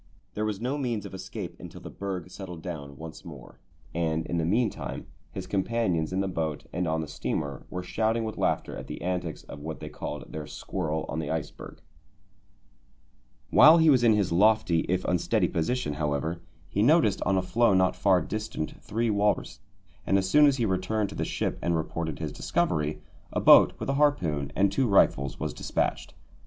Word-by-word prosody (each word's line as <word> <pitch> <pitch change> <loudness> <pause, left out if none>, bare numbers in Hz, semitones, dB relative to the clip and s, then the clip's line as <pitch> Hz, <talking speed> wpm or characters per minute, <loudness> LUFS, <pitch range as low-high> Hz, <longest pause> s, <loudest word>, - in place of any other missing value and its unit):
There 105 - -2
was 105 -2 -2
no 130 +5 -2
means 120 -6 -2
of - - -9
escape 95 - -6
until - - -10
the - - -9
berg 95 -3 -5
settled 90 -5 -8
down 70 -6 -7
once 80 0 -9
more, 70 -7 -12 0.3
and 80 -1 -1
in 85 - -1
the 80 - 0
meantime 110 +5 -1 0.3
his 95 - -6
companions 95 -4 0
in 95 +1 0
the 95 - -1
boat 80 -4 -3
and 90 +1 -1
on 80 0 0
the 80 - -5
steamer 70 -2 -4
were 90 0 -5
shouting 110 +4 0
with 110 -1 -4
laughter - - -1
at - - -8
the - - -7
antics 90 -2 -3
of 70 - -10
what 80 +2 -6
they - - -7
called - - -7
their 75 -1 -6
squirrel 80 -4 -3
on 80 - -3
the 75 - -3
iceberg. 80 -2 -5 1.7
While 160 +2 +8
he 160 -2 +6
was 125 -3 +4
in 115 -2 +6
his 105 -5 +1
lofty 90 -2 +3
if 90 +1 0
unsteady 90 -2 +1
position, 85 0 -1
however, 75 +3 -2 0.3
he 100 - -1
noticed 120 - +4
on 95 +1 +1
a 95 - +1
floe 115 +2 +3
not 95 0 +3
far 95 -4 +3
distant 110 -7 -5
three 115 +1 -1
walrus, 105 0 0 0.5
and 95 - +4
as 95 -1 0
soon 150 +9 +6
as 140 -1 +2
he 120 - +1
returned 100 +2 0
to - - -9
the - - -2
ship - - -2
and 85 -1 +1
reported 80 -1 -3
his - - -4
discovery, 75 0 -1 0.3
a - - -1
boat - - +7
with - - -5
a 135 - +1
harpoon 80 - +1
and 100 0 +3
two 130 +5 +1
rifles 70 - +3
was - - -3
despatched. - - -2
95 Hz, 195 wpm, -27 LUFS, 80-110 Hz, 1.7 s, While